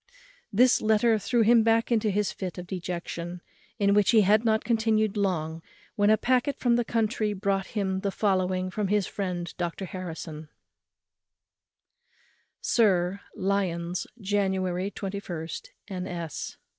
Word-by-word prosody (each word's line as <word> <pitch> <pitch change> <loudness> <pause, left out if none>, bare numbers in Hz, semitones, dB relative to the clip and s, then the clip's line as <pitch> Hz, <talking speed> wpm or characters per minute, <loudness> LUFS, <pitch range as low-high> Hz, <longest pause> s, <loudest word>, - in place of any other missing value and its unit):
This 245 +5 +4
letter 220 +1 +3
threw 230 +4 +1
him 230 +1 +6
back 225 +1 +2
into 220 -2 +2
his 205 0 0
fit 185 -2 -6
of 180 - -6
dejection, 175 -1 -5 0.4
in 200 -2 +3
which 205 -1 +4
he 225 -2 +6
had 210 +3 +4
not 220 -1 +2
continued 220 -3 +1
long 165 -5 -1 0.3
when 205 0 +3
a 215 - +6
packet 255 +4 +1
from 240 -2 +2
the 240 - +2
country 220 -2 0
brought 195 -1 -1
him 190 -2 0
the 200 - -1
following 185 -2 0
from 210 +1 -1
his 205 0 +2
friend 180 -4 -4
Dr 175 +2 -3
Harrison: 165 -4 -7 2.1
"Sir, 190 -4 +2 0.2
_Lyons, 180 -3 -1
January 190 -2 0
21, 190 -5 -5 0.4
N. 185 -1 -4
S. 170 -4 -5
200 Hz, 135 wpm, -27 LUFS, 180-215 Hz, 2.1 s, him